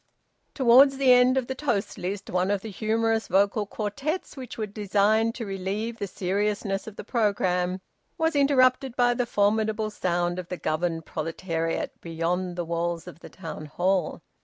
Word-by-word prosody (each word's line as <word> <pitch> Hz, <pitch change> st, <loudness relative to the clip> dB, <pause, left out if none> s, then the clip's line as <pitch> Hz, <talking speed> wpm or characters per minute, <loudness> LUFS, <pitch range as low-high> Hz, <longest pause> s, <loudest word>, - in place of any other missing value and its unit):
Towards 265 Hz, +1 st, +6 dB
the 265 Hz, -2 st, +5 dB
end 250 Hz, +1 st, +5 dB
of 260 Hz, -, +1 dB
the 265 Hz, -, -3 dB
toast 250 Hz, -7 st, -2 dB
list 195 Hz, +2 st, -4 dB
one 180 Hz, +1 st, +1 dB
of 200 Hz, -1 st, 0 dB
the 220 Hz, -, -7 dB
humorous 225 Hz, +2 st, 0 dB
vocal 200 Hz, +3 st, +2 dB
quartets 270 Hz, -, -3 dB
which 260 Hz, -4 st, -8 dB
were 220 Hz, -, -1 dB
designed 210 Hz, +2 st, +1 dB
to 235 Hz, -, -5 dB
relieve 200 Hz, +4 st, -3 dB
the 200 Hz, -, -2 dB
seriousness 195 Hz, +2 st, -1 dB
of 215 Hz, -, -8 dB
the -, -, -7 dB
programme, 185 Hz, -5 st, 0 dB, 0.4 s
was 320 Hz, -1 st, +1 dB
interrupted 265 Hz, -2 st, +3 dB
by 245 Hz, -1 st, +3 dB
the 245 Hz, 0 st, -1 dB
formidable 215 Hz, +1 st, +1 dB
sound 175 Hz, -2 st, -1 dB
of 180 Hz, -, -6 dB
the 180 Hz, -, -4 dB
governed 165 Hz, 0 st, -2 dB
proletariat 165 Hz, 0 st, -3 dB
beyond 175 Hz, +2 st, -2 dB
the 175 Hz, -1 st, -3 dB
walls 170 Hz, 0 st, -2 dB
of 180 Hz, -2 st, -11 dB
the -, -, -11 dB
Town 155 Hz, -5 st, -8 dB
Hall. 180 Hz, +2 st, 0 dB
205 Hz, 165 wpm, -26 LUFS, 180-235 Hz, 0.4 s, Towards